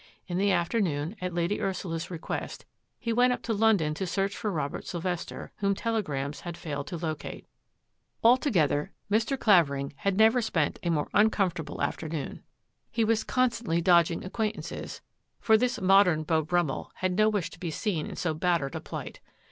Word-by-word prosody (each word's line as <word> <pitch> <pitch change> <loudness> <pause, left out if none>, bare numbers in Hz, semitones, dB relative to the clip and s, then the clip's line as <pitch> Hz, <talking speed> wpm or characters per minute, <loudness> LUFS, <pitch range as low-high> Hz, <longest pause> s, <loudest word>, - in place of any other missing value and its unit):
In 180 0 -2
the 200 +1 +3
afternoon, 175 -2 0
at 180 0 -2
Lady 175 +3 -1
Ursula's 170 -3 -3
request, 170 -3 -5 0.3
he 230 -2 -2
went 250 +2 +4
up - - -6
to 230 - -1
London 205 -8 +3
to 190 +4 -3
search 195 +2 -1
for 210 - -2
Robert 150 -5 -3
Sylvester, 175 0 -4
whom 200 -1 +1
telegrams 150 - -2
had 170 -1 -7
failed 145 -4 -5
to 175 - -4
locate. 155 -2 -5 0.8
Altogether 195 - +3 0.2
Mr. 225 +5 +1
Clavering 140 -10 +3
had 195 +3 0
never 225 +3 +5
spent 165 -9 0
a 175 - -1
more 155 -3 +1
uncomfortable 195 -6 +2
^ - - -6
MORE - - +1
MYSTERY 160 - -4
69 155 -3 -2
afternoon. - - -12 0.5
He 230 - 0
was 220 0 +2
constantly 235 -9 +1
dodging 170 -1 +4
acquaint 215 +3 -2
ances, - - -7 0.4
for 220 - +4
this 250 +3 +1
modem 185 -4 +5
Beau 160 0 +2
Brummell 170 -3 -1
had 185 0 -1
no 215 +2 +4
wish 205 -6 -1
to - - -13
be 175 - -3
seen 165 -1 -2
in - - -7
so 170 -3 -1
battered 155 -4 0
a - - -4
plight. - - -7
180 Hz, 180 wpm, -28 LUFS, 160-215 Hz, 0.8 s, never